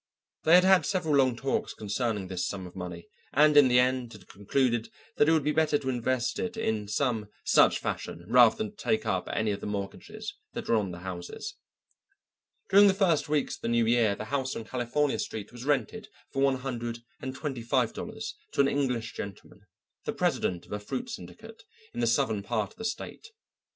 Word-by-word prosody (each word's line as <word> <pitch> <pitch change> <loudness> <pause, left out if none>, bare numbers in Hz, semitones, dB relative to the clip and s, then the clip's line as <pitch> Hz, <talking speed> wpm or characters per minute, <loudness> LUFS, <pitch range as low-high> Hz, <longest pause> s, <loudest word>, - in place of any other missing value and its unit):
They 160 +2 +7
had 180 - +7
had 190 -1 +6
several 180 -6 0
long 130 -3 +4
talks 135 +3 -2
concerning 105 -1 -2
this 90 -1 -2
sum 95 -2 -5
of 90 - -11
money, 90 -2 -7 0.3
and 150 0 +5
in 145 -2 +8
the 125 -1 +4
end 125 -1 +2
had 105 -3 -14
concluded 120 +3 0 0.3
that 150 - +5
it - - +5
would 160 -2 +3
be 150 - +1
better 155 -1 +3
to 130 - -4
invest 130 0 -1
it 230 0 -3
in 110 - -1
some 110 0 0 0.2
such - - +5
fashion 85 +1 -5
rather 120 0 +6
than 215 -1 -3
to - - -29
take 220 +1 0
up - - -1
any 110 -1 0
of 100 - -3
the - - -5
mortgages 105 - -5 0.2
that 235 - -5
were - - +2
on 105 -4 +2
the 90 0 -8
houses. 90 -1 -6 1.1
During 200 +1 +7
the 195 - +4
first 175 -8 +2
weeks 150 -2 0
of - - -28
the - - -3
new 115 0 +3
year 115 -3 +3
the 110 - -6
house 130 -2 0
on - - -4
California 130 +4 0
Street 110 -2 -5
was 120 +1 -9
rented 140 -6 -1 0.2
for 135 - -1
one 135 -1 +4
hundred 120 -3 -5 0.2
and 130 0 -5
twenty 140 -3 -4
five 115 - +1
dollars - - -6 0.2
to - - +4
an 140 - +4
English 125 -5 -1
gentleman, 100 -2 -9 0.4
the - - -1
president 90 -1 0
of - - -19
a 105 - -2
fruit 245 - -5
syndicate 225 -1 -10 0.3
in - - -5
the 120 - +2
southern 115 -3 +1
part 105 0 -2
of - - -21
the 225 - -6
state. 220 - -5
125 Hz, 205 wpm, -28 LUFS, 110-150 Hz, 1.1 s, in